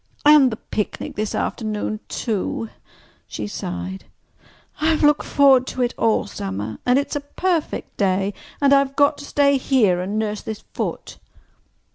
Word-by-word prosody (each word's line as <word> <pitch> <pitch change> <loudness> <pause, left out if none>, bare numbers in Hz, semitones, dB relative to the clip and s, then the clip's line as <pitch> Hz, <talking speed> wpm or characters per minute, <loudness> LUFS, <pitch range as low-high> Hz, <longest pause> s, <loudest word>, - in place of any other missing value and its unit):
"And 295 -4 +7
the - - -3
picnic 210 -2 -4
this 215 0 -2
afternoon, 215 -1 -2
too!" 190 - -3 0.6
she 105 - -5
sighed. 90 -2 -5 0.7
"I've 315 0 +2
looked 295 0 +4
forward 265 -2 +5
to 255 - -2
it 240 - -1
all 225 -1 +1
summer. 100 - -5
And 250 +1 +5
it's 280 - -1
a - - 0
perfect 330 +3 -2
day—and 200 +8 0
I've 275 -1 +3
got 285 0 +3
to 285 - -8
stay 280 -1 +3
here 220 -10 +2
and 200 +4 -3
nurse 215 -1 -2
this 220 -1 -6
foot." - - -4
225 Hz, 145 wpm, -21 LUFS, 195-280 Hz, 0.7 s, And